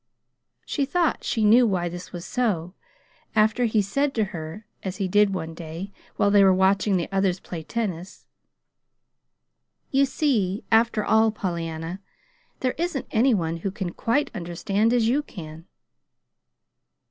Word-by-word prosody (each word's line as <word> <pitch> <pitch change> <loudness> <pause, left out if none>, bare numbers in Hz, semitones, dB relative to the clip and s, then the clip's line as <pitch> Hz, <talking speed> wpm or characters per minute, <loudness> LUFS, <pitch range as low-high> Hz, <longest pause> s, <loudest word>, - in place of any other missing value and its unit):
She 285 - -1
thought 330 +4 0
she 220 -2 0
knew 235 +3 +6
why 180 -4 0
this 175 +1 -7
was 175 -1 -7
so, 185 -9 -1 0.6
after 220 +3 +3
he 215 -2 +2
said 275 +8 0
to 220 - +2
her, 165 +5 -7 0.2
as 190 -1 -5
he 195 -3 -1
did 205 +2 +4
say - - -5
one 165 -3 -4
day, 165 +4 -7 0.2
while 200 - +2
they 200 -1 +6
were 190 - +6
watching 190 +1 +3
the 170 - -2
others 195 -2 +1
play 170 -3 -7
tennis: 190 -1 -4 1.7
"You 275 0 +3
see, 220 -10 0
after 225 -1 +3
all, 220 0 +4
Pollyanna, 170 -2 -4 0.6
there 255 -1 +1
isn't 340 -6 -2
any 235 +2 +4
one 165 -3 -1
who 180 +4 -3
can 190 -3 -4
quite 285 +6 0
understand 195 +4 0
as 240 -2 +3
you 265 +6 +2
can." 165 - -10
200 Hz, 150 wpm, -24 LUFS, 175-230 Hz, 1.7 s, knew